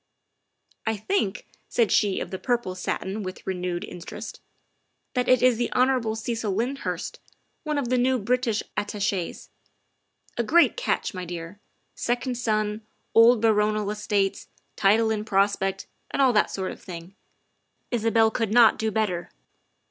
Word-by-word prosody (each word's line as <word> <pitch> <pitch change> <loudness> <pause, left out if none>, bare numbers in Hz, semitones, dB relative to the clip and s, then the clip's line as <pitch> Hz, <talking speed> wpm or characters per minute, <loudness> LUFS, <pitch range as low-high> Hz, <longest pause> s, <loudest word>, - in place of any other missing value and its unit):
I 220 -1 +1
think," 210 - -1 0.2
said 230 -4 +2
she 205 -3 +3
of - - -5
the 190 - -4
purple 240 -7 -1
satin 190 +2 -3
with 185 -1 -7
renewed 180 -1 -2
interest, 175 -4 -8 0.3
" - - -49
that 250 -1 0
it 255 -1 +5
is 250 -2 +5
the 240 - -1
Hon. 250 -3 +2
Cecil 225 -2 -2
Lyndhurst, 250 +7 -3 0.4
one 305 -1 -2
of 265 -4 -1
the 255 0 +2
new 260 +1 +3
British 240 0 0
Attaches. 200 -3 -2 0.9
A 235 - +1
great 340 +9 +4
catch, - - -1
my 185 -1 -5
dear. 170 +2 -7 0.3
Second 245 +1 -1
son, 215 -2 0 0.3
old 230 0 +6
baronial 210 -1 +2
estates, 205 -2 -1 0.3
title 220 +3 +3
in 215 -1 -1
prospect, 195 -2 +1 0.2
and - - -4
all 265 -3 +5
that 210 - +3
sort 190 -1 -3
of - - -11
thing. 175 0 -9 0.8
Isabel 225 -1 +3
could 220 -2 -1
not 230 -1 +6
do 220 - 0
better. 195 -6 -1
220 Hz, 150 wpm, -25 LUFS, 195-240 Hz, 0.9 s, old